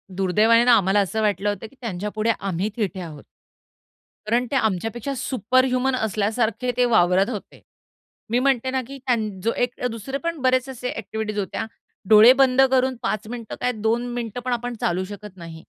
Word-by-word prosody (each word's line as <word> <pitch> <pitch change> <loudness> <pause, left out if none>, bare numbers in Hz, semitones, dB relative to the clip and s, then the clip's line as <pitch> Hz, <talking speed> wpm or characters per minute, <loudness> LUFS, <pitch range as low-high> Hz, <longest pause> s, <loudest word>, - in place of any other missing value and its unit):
दुर्दैवाने 215 +5 +4
ना 245 - +6
आम्हाला 195 +1 +2
असं 220 +3 -1
वाटलं 205 -1 0
होतं 205 +2 -4
की 275 - -22
त्यांच्यापुढे 215 +1 -2
आम्ही 195 +1 -2
थिटे 195 -3 -2
आहोत. 155 -4 -9 1.1
कारण 245 +2 +2
ते - - -1
आमच्यापेक्षा 225 +4 -1
सुपरह्युमन 255 +2 +1
असल्यासारखे 220 +2 -1
ते 250 - +4
वावरत 185 +2 +4
होते. 210 -5 -8 0.7
मी 240 - +2
म्हणते 260 -1 +1
ना 260 0 0
की 275 - -8
त्यांन 225 -4 +1
जो 230 - +2
एक 245 0 -2
अ, 250 - +2
दुसरे 235 +4 -5
पण 335 +1 -3
बरेचसे 255 +1 +1
असे 250 0 -5
ॲक्टिव्हिटीज 220 -1 -4
होत्या. 195 +2 -3 0.4
डोळे 220 +3 +9
बंद 265 -1 +5
करून 260 0 +2
5 215 +2 -2
मिनिटं 235 -2 -7
काय, 250 - +1
2 225 +2 -1
मिनिटं 235 -1 -4
पण 250 - 0
आपण 245 0 -3
चालू 175 +2 0
शकत 205 -2 -11
नाही. 165 -1 -10
225 Hz, 175 wpm, -23 LUFS, 205-250 Hz, 1.1 s, डोळे